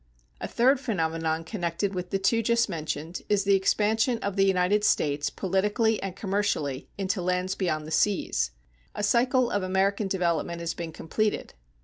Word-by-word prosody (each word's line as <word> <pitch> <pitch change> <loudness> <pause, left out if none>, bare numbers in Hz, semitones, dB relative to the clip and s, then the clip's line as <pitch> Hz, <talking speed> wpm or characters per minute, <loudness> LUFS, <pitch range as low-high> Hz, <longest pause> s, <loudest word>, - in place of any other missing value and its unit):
A - - -4
third 255 +3 +3
phenomenon 165 -8 -1
connected 175 +1 -2
with 180 -1 -4
the 195 - 0
two 210 +4 +2
just 235 +1 +2
mentioned 160 -2 -4
is 205 -1 +2
the 200 0 +3
expansion 220 +5 +2
of 200 -1 -2
the 195 -1 +4
United 190 +2 +2
States 145 -7 +1
politically 210 +4 0
and 195 -2 -4
commercially 190 -10 -1
into 195 -1 -1
lands 180 +1 0
beyond 155 -6 -1
the 155 - -8
seas. 205 +3 +1 0.5
A - - -3
cycle 245 +3 +3
of 205 - 0
American 195 +2 +1
development 170 -3 -1
has 170 -1 -3
been 170 -1 -6
completed. 210 +7 -2
190 Hz, 160 wpm, -27 LUFS, 170-210 Hz, 0.5 s, the